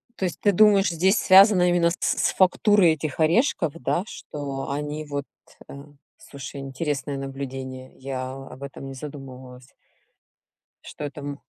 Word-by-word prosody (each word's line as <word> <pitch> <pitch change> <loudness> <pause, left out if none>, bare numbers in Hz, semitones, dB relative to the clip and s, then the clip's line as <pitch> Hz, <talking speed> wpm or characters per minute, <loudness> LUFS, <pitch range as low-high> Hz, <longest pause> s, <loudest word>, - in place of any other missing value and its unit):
То 190 - -2
есть, 175 - -4
ты 205 - +4
думаешь, 200 -2 +5
здесь 185 +5 +2
связано 190 -1 +6
именно 175 -1 +3
с 175 - -2
с - - +1
фактурой 190 -1 +4
этих 155 -2 -5
орешков, 165 - +2
да? 170 +2 -1
Что 140 -2 -6
они 150 +2 -4
вот, 145 -1 -4 0.4
э - - -9 0.4
слушай, 140 0 -9
интересное 135 0 -3
наблюдение. 135 -1 -7
Я 130 -1 -5
об 135 0 -10
этом 140 0 -8
не 135 - -7
задумывалась. 130 -3 -10 1.2
Что - - -9
это 145 0 -6
м 145 0 -6
145 Hz, 145 wpm, -24 LUFS, 135-175 Hz, 1.2 s, связано